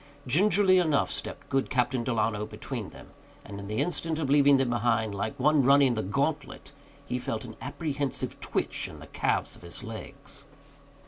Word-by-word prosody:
Gingerly 185 - +4
enough 155 -5 +2
stepped - - -3
good 135 0 0
Captain 125 -1 +1
Delano 110 -3 0
between - - -6
them, - - -14 0.3
and 100 -1 -8
in 100 - -7
the 105 +1 -3
instant 165 0 0
of 145 -4 -1
leaving 140 -1 +6
them 130 -2 +1
behind, 115 -2 +1
like 110 +7 -3
one 150 +2 +4
running 135 -1 +5
the 110 - -1
gauntlet, 140 +10 -2 0.3
he 125 - -2
felt 115 -2 -3
an 110 -2 -9
apprehensive 145 -1 -3
twitch - - -1
in - - -10
the - - -11
calves - - -1
of - - -16
his 85 -1 -7
legs. 140 +5 -8
130 Hz, 175 wpm, -28 LUFS, 110-145 Hz, 0.3 s, leaving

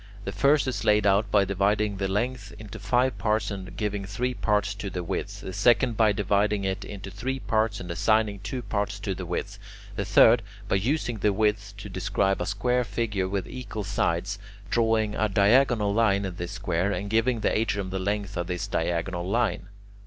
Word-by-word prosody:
The 100 - -2
first 140 +5 +3
is 115 -5 -2
laid 105 -1 +3
out 100 +1 +3
by 100 -1 +4
dividing 100 +1 +1
the 95 0 -1
length 105 +2 -2
into 110 +1 -9
five 125 +6 +1
parts 105 -1 0
and 95 -2 -7
giving 105 -2 -2
three 115 +6 -2
parts 105 -4 0
to 100 0 -5
the 90 -1 -4
width; 85 - -4
the 95 - -6
second, 115 +4 +3
by 110 -1 +4
dividing 100 0 +1
it 95 +1 -2
into 100 -1 -8
three 130 +6 -3
parts 110 -3 0
and 90 -1 -6
assigning 105 +3 +1
two 125 +5 -5
parts 105 -2 -2
to 100 -1 -2
the 90 -1 -6
width; 100 +3 -4 0.4
the 100 - -1
third, 110 +4 +6 0.3
by 95 - +2
using 120 +1 -1
the 105 +2 +2
width 105 -1 0
to 105 - -8
describe 95 0 0
a 90 - -2
square 125 +5 +1
figure 105 -3 -2
with 95 -2 -2
equal 120 -4 -6
sides, 95 0 -1 0.3
drawing 110 -2 +2
a 110 0 0
diagonal 105 +1 +3
line 100 -3 +2
in 95 -2 -5
this 85 +2 -5
square, 90 -1 -1
and 100 +1 -3
giving 115 +1 +2
the - - +1
atrium 100 -3 -1
the 95 - -2
length 100 +1 -2
of 85 0 -2
this 90 -1 -2
diagonal 85 +2 -2
line. 100 -5 0
100 Hz, 195 wpm, -26 LUFS, 95-110 Hz, 0.4 s, third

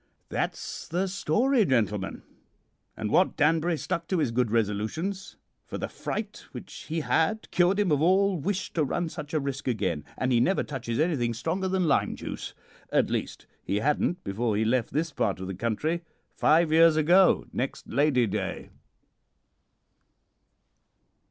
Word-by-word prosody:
"That's - - -3
the 180 +4 -1
story, 220 - +2
gentlemen, 105 - 0 0.7
and 110 -1 -3
Wat 185 - +3
Danbury 160 +2 +2
stuck 165 +2 -3
to 185 - 0
his 150 -7 +1
good 120 0 +1
resolutions, 115 - -2 0.3
for - - -5
the - - -3
fright 210 -1 -5
which - - -9
he 160 +1 -1
had 160 +8 0
cured 185 +2 +3
him 200 -5 +2
of 145 -1 +2
all 190 +3 +4
wish 190 +5 -2
to 160 - +1
run 165 +4 -1
such 150 -2 -8
a 155 - +1
risk 140 -1 -4
again; 95 - -1
and 130 0 0
he 120 - +4
never 185 +11 +2
touches 120 -5 -4
anything 135 -8 +1
stronger 170 - -2
than 185 -2 +1
lime 140 - +2
juice - - -7 0.4
at - - +2
least, - - -3 0.2
he 100 - -2
hadn't 150 - 0
before 105 +2 -1
he 110 - +1
left 120 +1 +1
this 160 +2 -1
part 100 -8 0
of 95 - -5
the 95 - -4
country, 115 - -1 0.3
five 160 +1 +3
years 165 0 +6
ago 175 +5 +4
next 130 +2 -3
Lady 140 -4 +2
Day." 100 -2 -4
150 Hz, 160 wpm, -27 LUFS, 115-175 Hz, 0.7 s, years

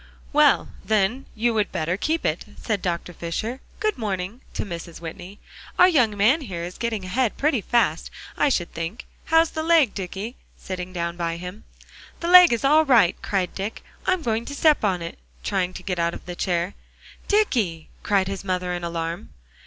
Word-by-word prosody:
"Well, - - +4
then, 220 +5 +1
you 235 +1 +1
would 215 -2 0
better 170 0 -1
keep 315 - -1
it," - - 0 0.2
said 215 -4 -2
Dr. 175 0 -3
Fisher. 195 +10 -4 0.2
"Good 430 -7 0
morning," 200 +2 -3
to - - -2
Mrs. 170 -3 -7
Whitney. 175 +4 -8 0.4
"Our 360 - +8
young 245 - +3
man 240 +11 +4
here 185 -10 -5
is 175 +1 -7
getting 225 -5 -2
ahead 235 +5 0
pretty 275 -5 +1
fast, 235 +3 +1 0.3
I 295 - +3
should 175 -9 -1
think. 165 +8 -5 0.2
How's 325 0 +4
the 315 - -3
leg, 320 -7 +4
Dicky?" 195 +5 -5 0.2
sitting 185 -1 -6
down 170 -1 -3
by 170 -1 -2
him. 180 +4 -8 0.5
"The 340 - -2
leg 360 -1 +9
is 235 +3 0
all 305 +3 +6
right," 235 - +5
cried 190 -3 -1
Dick; 200 +3 -5 0.2
"I'm 370 -3 +2
going 225 -1 0
to 285 - -6
step 305 -2 +4
on 185 -4 +1
it," 170 - -7 0.2
trying 180 - 0
to - - -8
get 180 -2 -2
out 170 0 0
of - - -11
the 175 - -6
chair. 175 +1 -1 0.5
"Dicky!" 225 - +1
cried 195 -2 +2
his 195 -1 -4
mother 180 -2 -1
in 175 -1 -4
alarm. 170 0 -4
200 Hz, 185 wpm, -24 LUFS, 175-255 Hz, 0.5 s, leg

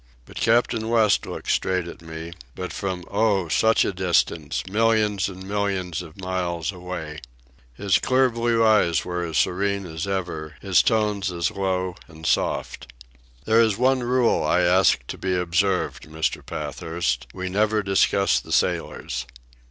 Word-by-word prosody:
But - - -13
Captain 115 -1 +2
West 110 -3 +3
looked - - -4
straight 90 -2 0
at 85 - -10
me, 80 +1 -8 0.2
but 90 -1 -5
from 95 -2 -3
oh! 100 -4 +2
such 110 +8 +3
a - - -1
distance—millions 95 - +1
and 95 0 -10
millions 95 -4 -2
of 80 -3 -12
miles 90 -2 -2
away. 90 -4 -7 0.6
His 100 +3 +2
clear 130 0 +2
blue 115 -1 +1
eyes 105 -7 +3
were 90 -1 -3
as 80 -3 -3
serene 100 +1 0
as 80 +1 -5
ever, 85 -5 -4
his 95 -2 +3
tones 105 -3 +1
as 85 -1 -1
low 95 -2 -2
and 80 -1 -12
soft. - - -1 0.5
"It 110 - -1
is 115 -2 +5
the 115 - -9
one 130 0 +3
rule 125 0 +2
I 75 +4 +2
ask 90 -8 +3
to - - -7
be 95 -1 -1
observed, 90 -1 0
Mr. 80 0 -2
Pathurst—we 80 0 -3
never 105 +2 +1
discuss 100 0 +2
the - - -12
sailors." - - -1
95 Hz, 150 wpm, -23 LUFS, 85-105 Hz, 0.6 s, is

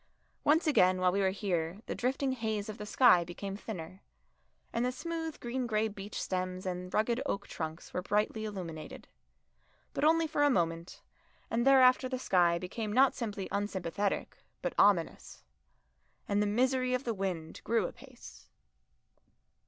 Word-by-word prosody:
Once 315 +4 +4
again 185 - +4
while 185 0 +3
we 200 +2 0
were 190 - +3
here 190 -2 -2
the - - -3
drifting 265 +2 -1
haze 220 -4 -2
of 215 - -7
the 210 - -6
sky 215 -6 +5
became 195 +3 -6
thinner, 185 -3 -7 0.7
and 235 - 0
the 250 - +1
smooth 325 +3 -5
green 245 +1 -3
grey 215 -1 +1
beech 205 -1 -7
stems 185 0 -3
and 180 0 -4
rugged 235 +4 +1
oak 200 - -3
trunks 160 0 -6
were 180 - -1
brightly 210 +3 0
illuminated. 175 -7 -7 0.9
But - - -2
only 325 +1 +4
for 300 -2 -1
a 290 - +5
moment, 170 -7 -1 0.5
and 235 +3 +1
thereafter 255 -1 +6
the 255 - -2
sky 175 -8 +3
became 205 +5 -4
not 260 +4 +5
simply 210 -5 -4
unsympathetic 200 -1 -2 0.3
but - - -1
ominous. - - +2 0.8
And 205 0 +1
the 210 - +2
misery 255 +3 +2
of 255 - -3
the 235 - -1
wind 185 -5 -4
grew 225 -3 +1
apace. 60 - -11
210 Hz, 155 wpm, -31 LUFS, 185-250 Hz, 0.9 s, thereafter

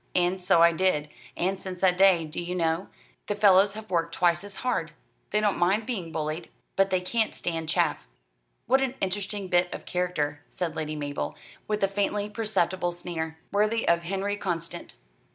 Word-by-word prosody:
And 180 +1 +2
so 170 -2 +5
I 170 - +7
did, 165 -4 +1 0.3
and 190 +2 0
since 185 -2 -7
that 185 -2 +4
day, 185 -3 +5
do 155 +2 -3
you 175 +1 -3
know, 165 +1 0 0.4
the 205 - -1
fellows 200 -1 +5
have 215 -1 -9
worked 165 -1 0
twice 175 0 +3
as 205 -1 -9
hard. 165 -11 0 0.4
They 210 - +2
don't 210 -2 +1
mind 195 +5 +3
being 190 -10 -4
bullied; 155 +1 -3 0.3
but 195 0 +3
they 185 -1 +1
can't 220 +4 0
stand 165 -2 -3
chaff." - - +1 0.6
"What 265 +3 +4
an 265 -1 0
interesting 200 +1 -2
bit 175 0 +2
of - - -7
character," 155 -5 -1
said 170 -3 -3
Lady 155 -1 -3
Mabel, 145 -1 -3 0.3
with 210 -1 -1
a - - +5
faintly 205 +1 -1
perceptible 185 -5 0
sneer. 160 -2 -5
"Worthy 215 +3 +1
of 170 0 +4
Henri 195 +3 -2
Constant." 170 -3 -4
180 Hz, 180 wpm, -27 LUFS, 170-200 Hz, 0.6 s, I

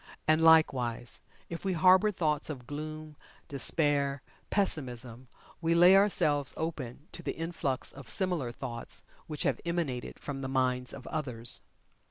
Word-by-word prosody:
And, 155 +1 +4
likewise, 130 -7 +3 0.3
if 170 - -7
we 190 -1 0
harbor 185 +5 +5
thoughts 155 -7 0
of 130 -5 -6
Gloom, 155 +1 -7 0.3
Despair, 140 0 +1 0.3
Pessimism, 125 - -1 0.3
we 165 0 +2
lay 175 +3 +8
ourselves 150 -8 +3
open 150 -3 -5
to - - -6
the - - -3
influx 160 -5 -3
of 140 -1 -11
similar 175 - +1
thoughts 120 -1 -6 0.2
which 150 -2 -3
have - - 0
emanated 170 -8 -3
from 140 -2 -6
the 130 - -3
minds 125 -1 0
of 135 - -10
others. 125 -7 -3
150 Hz, 140 wpm, -30 LUFS, 130-165 Hz, 0.3 s, lay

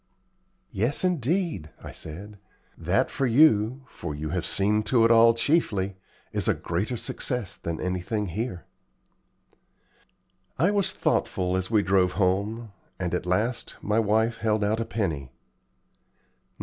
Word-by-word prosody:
"Yes, 120 - 0
indeed," 165 - 0
I - - -7
said. 100 +7 -9 0.4
"That 90 +4 0
for 135 -2 0
you 125 -1 +4
for 80 -10 -6
you 75 +1 -4
have 85 +1 -2
seen 100 +5 +2
to 120 -3 +4
it 115 - +4
all 115 0 +6
chiefly 105 - +1 0.4
is - - -1
a - - +3
greater 100 +9 -2
success 115 -4 -3
than 85 -3 -5
anything 90 +4 -2
here." 100 0 -4 1.9
I 180 +5 +3
was 200 -2 +1
thoughtful 90 0 0
as 95 0 -2
we 110 -3 +3
drove 95 -2 +2
home, 105 +4 0 0.3
and - - -3
at - - -2
last 115 +6 -1
my 105 +1 +1
wife 110 +2 +2
held 110 -1 0
out 105 +2 +1
a 115 - -1
penny. 80 - -2
105 Hz, 135 wpm, -26 LUFS, 90-115 Hz, 1.9 s, all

